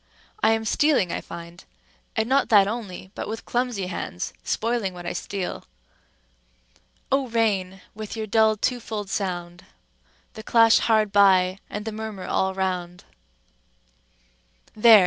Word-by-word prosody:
I 225 - +5
am 220 0 -1
stealing, 260 - +2
I - - -3
find, 170 +1 -10 0.5
and 220 -1 0
not 270 +2 +2
that 200 -3 +6
only, 200 -4 -6
but - - -5
with 220 +2 -6
clumsy 245 -5 -1
hands 170 - -5
spoiling 225 -5 -1
what 175 -1 -9
I - - -2
steal:— 195 -3 -4 1.5
"O 270 -1 +2
Rain! 200 -5 0
with 215 +1 -7
your 220 - -2
dull 220 0 +3
twofold 220 -4 -3
sound, 175 -3 -3 0.7
The 220 - -8
clash 230 0 +5
hard 215 -2 +2
by, 190 -2 +4
and 210 +1 -5
the 220 - -3
murmur 215 -3 -6
all 190 0 0
round:" 180 -2 -3 1.7
—there! 220 0 +8
210 Hz, 135 wpm, -24 LUFS, 185-225 Hz, 1.7 s, there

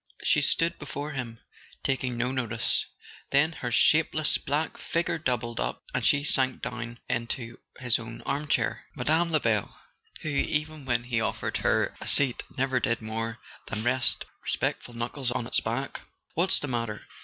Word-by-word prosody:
She - - +4
stood 165 +1 +2
before 145 0 -5
him, 125 -5 -4 0.5
taking 130 -2 0
no 125 +2 0
notice; 120 -4 0 0.4
then 150 +4 +4
her 125 -6 -4
shapeless 155 +4 +4
black 150 +2 -1
figure 170 0 0
doubled 120 -5 -1
up, - - -2
and - - 0
she 145 0 +4
sank 130 -3 +3
down 120 0 -4
into 120 0 -3 0.2
his 125 -2 +1
own 115 0 -8
armchair. 145 +1 0
Mme. 165 +3 +2
Lebel, 115 - +1 0.5
who, 155 - -3
even 150 0 -1
when 120 -2 +1
he 120 -2 0
offered 110 - -1
her - - +1
a - - -6
seat, 135 -4 +4 0.2
never 130 0 +2
did 115 -2 +1
more 115 +1 -3 0.3
than 110 +1 -3
rest 120 +1 +2 0.2
respectful 120 - -1
knuckles 120 +2 -2
on 120 -1 -1
its - - +2
back! 120 +5 -3 0.3
"What's 175 +4 +5
the 145 - -3
matter? 115 -4 -2
125 Hz, 155 wpm, -28 LUFS, 115-145 Hz, 0.5 s, What's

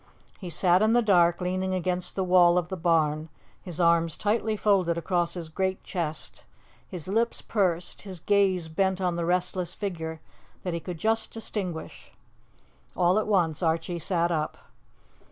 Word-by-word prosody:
He 185 - -6
sat 175 +3 +3
in 220 +1 +4
the 240 0 +4
dark 175 -4 +4
leaning 185 +1 -1
against 180 0 -2
the 190 - 0
wall 180 -1 +5
of 175 -1 -1
the 190 - -3
barn, 160 -3 +1 0.3
his 180 -3 -7
arms 170 -1 +3
tightly 215 +1 0
folded 185 -5 +2
across 175 0 -1
his 170 -2 -5
great 190 +4 -2
chest, 160 -4 -5 0.4
his 180 -4 -7
lips 230 +4 0
pursed, 180 -5 -1
his 190 -4 -9
gaze 190 -3 +2
bent 190 +3 0
on 180 -2 0
the 170 -1 -2
restless 180 0 -1
figure 165 -5 -4 0.4
that 180 - -2
he 170 - -2
could 175 +1 -6
just 220 +5 0
distinguish. 195 -7 -6 0.8
All 180 +3 +3
at 215 - -2
once 175 -7 +1
Archie 165 +1 0
sat 170 0 0
up. 155 -2 -2
180 Hz, 160 wpm, -27 LUFS, 170-190 Hz, 0.8 s, wall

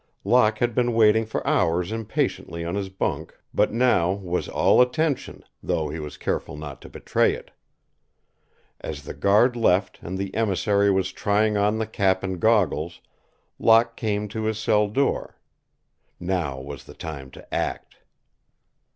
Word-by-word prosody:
Locke 110 0 +3
had 120 +1 0
been 120 0 +1
waiting 110 0 +4
for - - -4
hours 85 +4 +1
impatiently 100 -6 -2
on 85 - -3
his 100 -1 -3
bunk, 95 - -3 0.2
but - - +2
now 110 -7 +2
was 90 -3 -3
all - - +4
attention, 140 +4 0 0.2
though 80 - -1
he 80 - -5
was 75 -1 -7
careful - - -3
not 75 -2 -8
to - - -11
betray - - +1
it. - - -12 1.3
As 75 -2 -6
the - - -7
guard 105 +5 +3
left 95 -4 +1
and 95 +2 -5
the 95 0 -4
emissary 100 -1 +2
was 95 -1 +1
trying 105 +1 +1
on 105 +1 +2
the 110 - -1
cap 95 -3 0
and 95 -2 -3
goggles, 90 -7 +1 0.6
Locke 115 +1 +4
came 105 -1 -2
to 110 +1 -4
his 110 -1 -1
cell 105 -1 +2
door. 135 +7 -1 0.8
Now 85 -7 -2
was 70 +1 -9
the - - -13
time 70 -5 -7
to - - -14
act. - - -3
100 Hz, 155 wpm, -24 LUFS, 90-110 Hz, 1.3 s, waiting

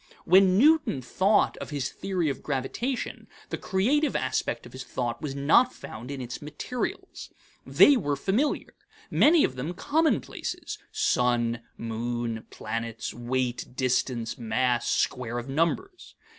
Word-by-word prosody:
When 185 +1 +6
Newton 295 - +4
thought 195 - +2
of - - -7
his 140 -3 -2
theory 185 -4 -2
of 140 - -2
gravitation, 150 - -3 0.2
the - - -3
creative 265 +11 +1
aspect - - -1
of - - -12
his 130 0 -6
thought 120 -2 -3
was 140 -3 -4
not 160 - +4
found 120 +4 -9
in 140 -1 -5
its 125 -1 -6
materials. 150 - -5 0.4
They 290 - +7
were 145 - 0
familiar; 205 - 0 0.4
many 320 0 +5
of 130 - 0
them 155 +8 -4
commonplaces 315 - -1
sun, 120 - +1 0.2
moon, 115 0 -3
planets, 115 +1 -4
weight, 125 +1 -2
distance, 125 -2 -1
mass, 120 +1 0
square 120 -1 0
of 120 +1 -5
numbers. 170 - -2
135 Hz, 130 wpm, -27 LUFS, 120-195 Hz, 0.4 s, They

